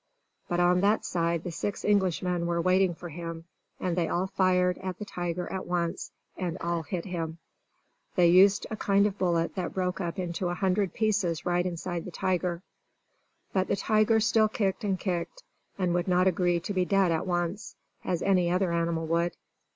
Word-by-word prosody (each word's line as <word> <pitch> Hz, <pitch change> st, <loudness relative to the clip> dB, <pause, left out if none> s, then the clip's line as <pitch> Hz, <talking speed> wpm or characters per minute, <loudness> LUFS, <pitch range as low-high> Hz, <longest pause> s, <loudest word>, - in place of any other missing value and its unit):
But 175 Hz, -, 0 dB
on 180 Hz, +1 st, +4 dB
that 205 Hz, +2 st, +2 dB
side 170 Hz, -1 st, 0 dB
the 175 Hz, -, -4 dB
six 200 Hz, +4 st, -4 dB
Englishmen 180 Hz, -3 st, +1 dB
were 170 Hz, 0 st, 0 dB
waiting 185 Hz, 0 st, +3 dB
for 175 Hz, +1 st, -8 dB
him; 165 Hz, 0 st, -7 dB, 0.3 s
and 180 Hz, -2 st, -1 dB
they 170 Hz, -2 st, +1 dB
all 180 Hz, +2 st, 0 dB
fired 180 Hz, -1 st, +2 dB
at 185 Hz, -1 st, -5 dB
the 210 Hz, -, -6 dB
tiger 175 Hz, -2 st, -3 dB
at 190 Hz, -, -4 dB
once, 175 Hz, -1 st, -2 dB, 0.2 s
and 180 Hz, -3 st, -3 dB
all 170 Hz, 0 st, -1 dB
hit 170 Hz, +1 st, -4 dB
him. 165 Hz, -3 st, -4 dB, 0.8 s
They 180 Hz, -, +5 dB
used 190 Hz, +4 st, +6 dB
a -, -, -1 dB
kind 200 Hz, 0 st, +3 dB
of 200 Hz, -1 st, -2 dB
bullet 170 Hz, -2 st, +1 dB
that 180 Hz, -3 st, -4 dB
broke 185 Hz, 0 st, -1 dB
up 170 Hz, -2 st, -3 dB
into 180 Hz, 0 st, -2 dB
a 175 Hz, -, -2 dB
hundred 190 Hz, +1 st, 0 dB
pieces 205 Hz, -7 st, 0 dB
right 175 Hz, 0 st, +1 dB
inside 175 Hz, -1 st, -4 dB
the -, -, -6 dB
tiger. 180 Hz, 0 st, -1 dB, 0.9 s
But 190 Hz, -1 st, +1 dB
the -, -, +1 dB
tiger 215 Hz, +2 st, +3 dB
still 220 Hz, 0 st, +3 dB
kicked 195 Hz, -3 st, -1 dB
and 195 Hz, -3 st, 0 dB
kicked, 185 Hz, -, -3 dB, 0.3 s
and 180 Hz, -3 st, 0 dB
would 175 Hz, +1 st, 0 dB
not 180 Hz, 0 st, +3 dB
agree 175 Hz, -1 st, +2 dB
to 205 Hz, -, -4 dB
be 185 Hz, -1 st, +2 dB
dead 195 Hz, -1 st, +2 dB
at 160 Hz, +2 st, -1 dB
once, 175 Hz, +3 st, -2 dB, 0.3 s
as 175 Hz, -2 st, -1 dB
any 185 Hz, -3 st, +3 dB
other 180 Hz, 0 st, +1 dB
animal 165 Hz, -1 st, 0 dB
would. 170 Hz, +1 st, 0 dB
180 Hz, 190 wpm, -28 LUFS, 170-190 Hz, 0.9 s, used